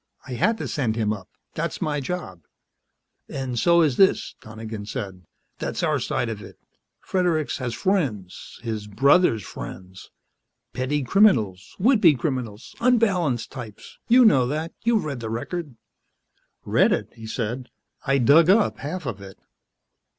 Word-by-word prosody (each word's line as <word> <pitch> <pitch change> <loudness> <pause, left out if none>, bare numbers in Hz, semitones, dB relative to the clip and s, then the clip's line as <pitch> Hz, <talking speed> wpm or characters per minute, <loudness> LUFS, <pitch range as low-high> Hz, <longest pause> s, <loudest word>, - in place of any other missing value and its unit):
I - - -9
had 195 - +1
to - - -4
send 120 -7 -1
him 110 -2 0
up. 100 -3 -9 0.2
That's - - -3
my 150 -1 -1
job." 140 - -5 0.9
"And 130 -3 -3
so 170 +6 +4
is 145 -6 +1
this," 195 - +3
Donegan 110 -1 -8
said. 95 -5 -6 0.3
"That's - - -3
our - - +1
side 120 - -1
of 110 -2 -5
it. - - -12 0.4
Fredericks 175 -6 0
has 120 -3 -3
friends 120 - -2
his 110 -3 -4
brother's 125 - +3
friends. 95 0 -9 0.6
Petty 130 +4 -1
criminals, 120 - +2
would 230 +3 +3
be 165 -7 +6
criminals, 120 -4 -4
unbalanced 195 - +2
types. 120 -6 -10
You 245 +1 +6
know 130 - +5
that. 155 +5 -3
You've 230 -5 +2
read 140 -4 -4
the 115 -1 -5
record." 140 +5 -5 0.9
"Read - - +3
it?" - - -2
he 115 -1 -10
said. 120 +3 -4 0.3
"I 140 -1 +2
dug 145 +7 +5
up 205 +2 +3
half 160 +4 -5
of 110 -6 -5
it." 95 -1 -11
130 Hz, 150 wpm, -24 LUFS, 110-170 Hz, 0.9 s, be